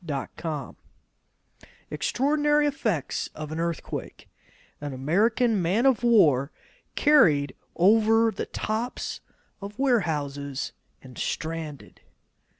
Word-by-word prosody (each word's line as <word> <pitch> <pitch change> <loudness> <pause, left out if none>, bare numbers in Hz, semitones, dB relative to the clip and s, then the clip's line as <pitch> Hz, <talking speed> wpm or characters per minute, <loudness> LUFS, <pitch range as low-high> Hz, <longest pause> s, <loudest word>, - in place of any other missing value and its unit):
Extraordinary 295 - +1
Effects 225 - -1
of 155 0 -7
an 160 - -4
Earthquake 170 -1 -5 0.5
An 145 -2 -5
American 210 - +1
Man 190 +9 +1
of 265 -3 +4
War 160 - +4 0.4
Carried 150 - +4 0.2
Over 225 +4 +4
the 195 - -5
Tops 225 +3 -3 0.4
of 200 +2 -8
Warehouses 145 - -1 0.3
and 130 -2 -12
Stranded. 160 -3 -5
195 Hz, 85 wpm, -26 LUFS, 150-235 Hz, 0.5 s, of